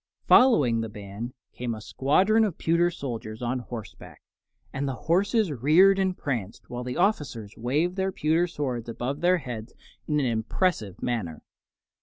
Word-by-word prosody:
Following 145 - +5
the 110 - -4
band 105 +3 -7 0.2
came 120 -2 -3
a - - -8
squadron 185 - +2
of 200 -7 -1
pewter 170 +1 +2
soldiers 120 -8 -6
on 125 +2 -1
horseback, 110 - -9 0.5
and 140 +1 -2
the 135 - -2
horses 195 - +1
reared 160 +10 +5
and 190 -1 0
pranced, 115 -8 -4
while 125 0 -4
the 125 0 -4
officers 145 - 0
waved 150 - 0
their 190 0 0
pewter 165 +1 +1
swords 125 -8 -4
above 125 +6 -4
their 180 +1 +4
heads 120 -7 -7 0.3
in 150 -1 +1
an 140 - +1
impressive 110 - -1
manner. 105 -11 -3
135 Hz, 155 wpm, -26 LUFS, 115-175 Hz, 0.5 s, Following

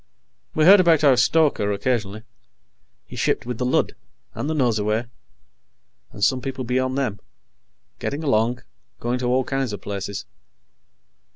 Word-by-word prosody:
We 155 - +3
heard 195 +3 +9
about 165 -4 +4
our 140 -3 +6
stoker, 130 -5 +2
occasionally. 110 -1 -2 0.8
He - - -11
shipped - - 0
with 125 -1 -5
the 125 - 0
Lud, 125 - +1 0.4
and 145 - -4
the 160 - -1
Nosurwey, 110 -4 +1 1.1
and 100 - -6
some 130 +6 +2
people 130 0 -4
beyond 130 +2 -1
them, 115 -8 -2 0.8
getting 145 +3 -3
along, 120 -2 +1 0.4
going 120 +1 -2
to 125 - -2
all 130 +2 +2
kinds 135 -4 -2
of 100 - -6
places. 100 0 -5
125 Hz, 145 wpm, -22 LUFS, 110-135 Hz, 1.1 s, heard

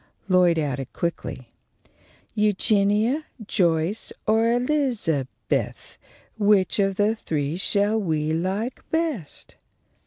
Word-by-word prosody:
Lloyd 180 -3 +4
added, 140 -4 -2
quickly: 130 -7 -4 0.8
"Eugenia, 210 +6 +2 0.2
Joyce, 175 +1 0
or 225 +1 +3
Elizabeth, 245 - -1 0.4
Which 205 -2 +3
of 195 -1 +2
the 205 +2 +2
three 150 -7 -2
shall 205 +3 +2
we 155 -4 0
like 190 +9 -2
best?" 315 - -3
200 Hz, 90 wpm, -24 LUFS, 165-220 Hz, 0.8 s, Lloyd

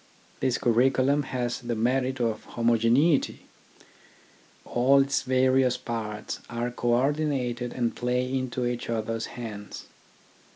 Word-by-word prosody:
This 130 -2 +1
curriculum 130 +4 +3
has 125 -3 -3
the 120 -2 -3
merit 130 +3 0
of 115 -2 -1
homogeneity. 120 +6 +2 1.2
All 130 +3 +4
its 135 0 +2
various 130 -1 +2
parts 105 -3 -5
are 120 +1 -2
co 120 0 +1
ordinated 130 -3 0
and 120 -2 -1
play 125 +1 0
into 130 -1 -2
each 120 -1 -3
other's 115 0 -2
hands. 105 -4 -7
125 Hz, 115 wpm, -27 LUFS, 115-130 Hz, 1.2 s, All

